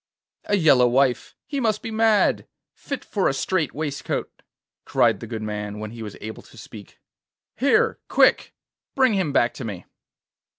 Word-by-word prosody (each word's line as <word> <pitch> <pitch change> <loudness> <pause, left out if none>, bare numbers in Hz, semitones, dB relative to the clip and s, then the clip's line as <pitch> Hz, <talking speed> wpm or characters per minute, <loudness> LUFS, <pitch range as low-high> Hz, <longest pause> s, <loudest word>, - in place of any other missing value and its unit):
'A 205 - +1
yellow 140 -8 +5
wife! 130 +1 +1
He 280 - -3
must 220 -4 0
be 225 - -5
mad! 220 -1 +2 0.3
fit 280 - -7
for 200 -3 0
a 135 - -2
strait 165 +1 -1
waistcoat!' 145 -2 -4 0.4
cried - - +2
the 115 - -8
good 110 -1 -5
man, 105 -1 -5
when 105 0 -6
he 115 0 -9
was 105 -2 -7
able 110 +1 -7
to - - -19
speak. 110 -2 -12 0.6
'Here! 275 +3 +2
quick! - - +3 0.4
bring 260 -4 +3
him 190 -7 0
back 120 -3 +2
to - - -8
me. 100 -6 -6
135 Hz, 165 wpm, -23 LUFS, -, 0.6 s, yellow